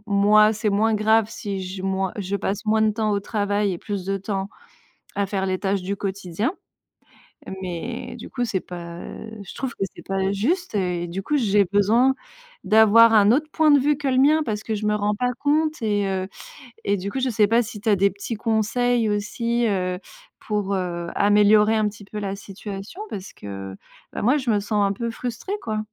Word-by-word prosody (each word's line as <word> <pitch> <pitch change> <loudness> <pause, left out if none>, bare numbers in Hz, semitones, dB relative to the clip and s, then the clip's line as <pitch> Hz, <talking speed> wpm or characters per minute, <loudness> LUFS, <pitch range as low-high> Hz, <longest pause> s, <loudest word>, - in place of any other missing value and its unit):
moi, 210 +1 +5
c'est 215 0 -1
moins 220 +2 +2
grave 220 0 +3
si 200 -4 -5
je 185 0 -6
moi 190 -1 -1
je 200 0 -2
passe 200 +2 -3
moins 220 0 +2
de 215 - +4
temps 215 -1 -1
au 200 - +1
travail 205 -1 0
et 175 - -4
plus 200 -3 -4
de 195 0 -1
temps 195 0 -3 0.7
à 200 0 0
faire 190 -1 -2
les 185 -1 -1
tâches 195 -2 -1
du 200 +2 -3
quotidien. 195 - -2 1.1
Mais 175 -2 -5
du - - -9
coup, 245 -2 -2
c'est 205 -5 -1
pas, 170 -1 -8
heu, 220 - -8
je 190 - -10
trouve 265 -2 -4
que 195 - -2
c'est - - -11
pas 195 0 -1
juste 310 - -1
et 180 -3 -1
du 180 +3 -5
coup, 295 +9 0
j'ai 205 -5 +3
besoin 225 +6 +4 0.5
d'avoir 220 +1 +6
un 210 -1 +6
autre 305 +4 +1
point 315 -2 +4
de 290 - +7
vue 290 +2 +2
que 285 -2 -2
le 255 - +1
mien 305 +3 +5
parce 215 -3 -3
que 220 - -2
je 210 0 -4
me 210 - +2
rends 210 0 0
pas 250 +3 0
compte 305 +1 +1
et 205 -2 +1
heu, 190 -1 -1 0.6
et 200 - +2
du 195 +2 -4
coup, 270 - -2
je 260 0 0
sais 210 -1 +3
pas 230 +3 +3
si 215 -2 -8
tu 220 - 0
as 205 - +5
des 200 +1 +3
petits 200 +4 -5
conseils 225 +1 +1
aussi, 230 +3 0
heu, 185 -3 -1 0.4
pour, 205 -2 -2
heu, 175 -2 -3
améliorer 210 +1 +5
un 215 -1 +2
petit 205 -1 -13
peu 210 +1 -6
la 200 -1 -3
situation 200 - -8
parce 195 0 -7
que, 95 -1 -8 0.4
bah - - -4
moi 255 +7 +3
je 255 -5 0
me 205 - +2
sens 205 -1 +1
un 195 - 0
peu 235 +3 -3
frustrée, 245 - -5
quoi. 215 -1 -2
210 Hz, 215 wpm, -23 LUFS, 195-225 Hz, 1.1 s, de